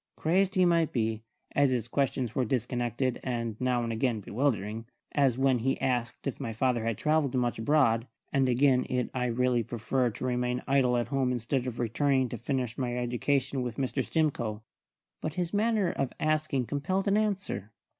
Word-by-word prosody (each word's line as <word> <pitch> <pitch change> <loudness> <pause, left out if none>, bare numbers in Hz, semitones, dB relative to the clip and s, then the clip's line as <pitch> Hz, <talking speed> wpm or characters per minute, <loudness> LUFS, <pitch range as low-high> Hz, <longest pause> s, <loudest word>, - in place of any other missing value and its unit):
Crazed 190 +4 +1
he 185 -1 +5
might 170 -2 +3
be, 110 -2 -1 0.3
as 140 -1 +3
his 120 -3 -1
questions 130 -2 -1
were 130 - +1
disconnected 120 +1 -1
and 115 -3 -2
now 125 -1 +1
and 115 -1 -2
again 115 0 0
bewildering, 110 -1 -1 0.2
as 135 -4 +2
when 135 -2 +3
he 135 +4 0
asked 120 -2 -1
if 140 - -3
my 115 -5 -3
father 120 0 +1
had 115 -3 -1
travelled 150 -4 +1
much 120 -3 0
abroad, 115 -3 +3 0.3
and 135 -2 +3
again 130 +1 +4
it 125 -1 -1
I 125 -1 0
really 125 0 +2
preferred 120 +1 -1
to - - -4
remain 125 0 -1
idle 130 -3 +3
at 120 -1 -1
home 135 -2 +1
instead 125 +2 -1
of 120 -2 -4
returning 130 +2 +1
to 120 - -5
finish 125 -2 -2
my 125 -2 -1
education 130 +2 0
with 120 -2 -4
Mr. 130 -2 -1
Stimcoe; 120 -9 -1 0.6
but 155 0 -3
his 175 0 -2
manner 210 -2 +2
of 135 -2 -2
asking 155 -4 +1
compelled 185 - -1
an 200 - +3
answer. 195 - -1
125 Hz, 180 wpm, -29 LUFS, 120-140 Hz, 0.6 s, he